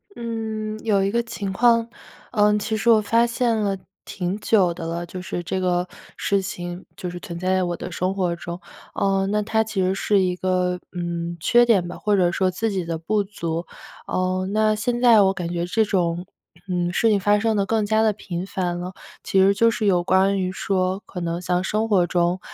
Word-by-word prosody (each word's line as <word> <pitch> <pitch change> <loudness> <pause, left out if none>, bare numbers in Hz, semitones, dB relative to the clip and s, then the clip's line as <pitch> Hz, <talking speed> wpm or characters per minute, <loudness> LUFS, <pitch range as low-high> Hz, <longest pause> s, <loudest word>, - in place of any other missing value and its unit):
嗯， 220 -2 -4
有 200 -3 +3
一 195 - +1
个 235 +3 0
情 205 -4 -5
况， 230 +3 +3 0.4
呃， 210 -2 +3
其 220 +2 -2
实 225 +3 +1
我 220 -1 +5
发 230 +3 +3
现 235 0 0
了 205 -2 0 0.3
挺 180 +1 -3
久 195 -6 +3
的 165 - -7
了， 170 +1 -3
就 185 +1 -7
是 175 0 -4
这 180 +2 -3
个 180 -1 0 0.3
事 200 - +1
情 175 -1 -6
就 180 - -5
是 175 0 -7
存 170 -1 -7
在 185 - -3
在 185 - +2
我 175 -1 -1
的 180 - -7
生 185 +3 -1
活 180 -3 -1
中， 170 +1 -7 0.3
呃， 195 -1 +1
那 210 0 +1
它 220 +1 +1
其 215 -3 -2
实 185 +1 +1
是 205 +1 +2
一 180 -1 +1
个 180 -1 0 0.2
嗯， 170 -1 -3
缺 240 +9 +4
点 200 -7 +3
吧， - - -7
或 210 -1 +1
者 180 -3 +3
说 185 +1 +1
自 220 +5 -1
己 190 -4 -2
的 165 -1 -3
不 205 +5 0
足。 170 -4 -4 0.4
呃， 185 0 -1
那 215 0 +3
现 240 +3 -1
在 235 -4 +7
我 195 -1 +3
感 175 -3 -4
觉 170 0 -1
这 220 +5 +2
种 175 -3 0 0.4
嗯， 175 -1 -1
事 225 - +3
情 210 -2 +3
发 205 +2 +3
生 220 0 +1
得 200 - +1
更 220 +1 +1
加 220 +1 +2
地 220 -1 +3
频 180 -3 -5
繁 180 -3 -2
了， 180 +1 -6 0.3
其 195 - +1
实 195 +1 +5
就 230 +2 +4
是 215 - -2
有 180 -3 +3
关 195 +2 +3
于 185 -1 -1
说， 190 0 -1
可 180 - -6
能 170 0 -3
像 180 0 0
生 215 +3 -1
活 190 -4 +4
中， 175 +1 +1
190 Hz, 235 characters per minute, -23 LUFS, 180-215 Hz, 0.4 s, 在